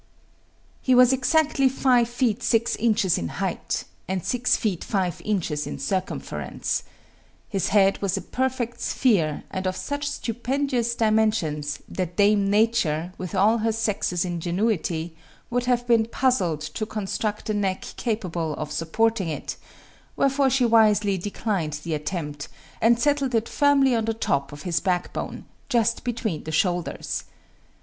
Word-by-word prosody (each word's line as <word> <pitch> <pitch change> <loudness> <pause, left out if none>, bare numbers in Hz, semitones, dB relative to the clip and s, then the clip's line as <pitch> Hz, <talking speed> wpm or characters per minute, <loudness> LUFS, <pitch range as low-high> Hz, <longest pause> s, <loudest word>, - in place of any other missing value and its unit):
He 255 - +3
was 250 +1 +7
exactly 275 +1 +3
five 250 -3 +3
feet 240 -2 0
six 235 0 +2
inches 210 -5 +2
in 85 - -3
height, - - -3 0.2
and 185 -2 -2
six 250 0 +2
feet 200 -7 -1
five 185 -4 -1
inches 165 -8 -1
in - - -5
circumference. 185 +8 -2 0.7
His 195 -4 0
head 195 -1 +3
was 195 -1 0
a - - -3
perfect 255 -2 -2
sphere, 175 - +1
and 190 -1 -2
of 185 - -1
such 285 0 -3
stupendous 245 0 -1
dimensions, 215 -10 +1
that 180 -2 -4
Dame 205 -1 +4
Nature, 195 -6 +1
with 185 +1 -5
all 215 +5 +4
her 225 +1 +1
sex's 210 -5 -1
ingenuity, 175 -1 -1 0.4
would 245 0 0
have 245 -1 +1
been 230 -2 +3
puzzled 230 - +1
to 160 +8 -4
construct 215 +1 -3
a - - 0
neck 195 -2 -1
capable 175 -9 -2
of 150 -1 -5
supporting 190 +5 0
it; 155 - -4 0.6
wherefore 275 0 +2
she 260 -1 +2
wisely 215 -3 +4
declined 195 -4 -2
the 170 - -3
attempt, 150 -1 -4 0.3
and 230 +1 +4
settled 280 -2 +1
it 225 0 +1
firmly 280 -3 +3
on 225 -2 +1
the 225 0 -1
top 140 -10 -1
of 145 +1 -9
his 170 -3 0
backbone, 180 +1 -2 0.2
just 230 -3 +1
between 225 -9 -2
the 160 - -4
shoulders. 175 +1 -1
215 Hz, 145 wpm, -24 LUFS, 175-240 Hz, 0.7 s, was